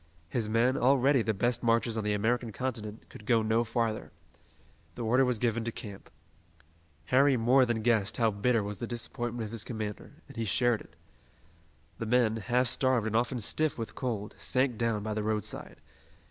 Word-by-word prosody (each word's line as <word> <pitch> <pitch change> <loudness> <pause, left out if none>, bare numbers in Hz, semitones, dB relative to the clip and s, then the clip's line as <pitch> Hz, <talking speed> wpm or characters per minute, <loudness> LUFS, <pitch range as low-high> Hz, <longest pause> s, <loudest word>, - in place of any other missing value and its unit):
His 110 0 -2
men, 120 +4 +2
already 135 +1 +4
the 110 - 0
best 120 +4 0
marchers 115 -1 +2
on 110 - -2
the 105 0 0
American 115 +3 0
continent, 110 -3 -5
could 110 - -13
go 115 -3 +3
no 110 +2 +2
farther. 115 -2 -2 0.8
The 120 - -5
order 125 +4 +3
was 125 -2 +1
given 115 0 0
to 115 - -1
camp. 100 -3 -9 1.0
Harry 135 0 +5
more 125 +3 +4
than 115 -2 -1
guessed 110 -3 +2
how 115 -2 +3
bitter 110 +2 +1
was 100 0 -5
the 120 - -4
disappointment 120 0 -4
of 105 - -8
his 115 -2 -2
commander, 110 -3 -6
and - - -13
he 115 - -1
shared 120 +3 +2
it. - - -16 1.0
The 115 - -3
men, 115 -2 +3
half 120 +4 +1
starved 125 -2 +2
and 110 0 -2
often 120 +2 +1
stiff 155 +7 0
with 115 -2 -5
cold, 110 -6 -4
sank 130 -1 +1
down 115 -2 -1
by 110 0 -2
the 105 - -2
roadside. 105 -1 -3
115 Hz, 185 wpm, -30 LUFS, 110-125 Hz, 1.0 s, Harry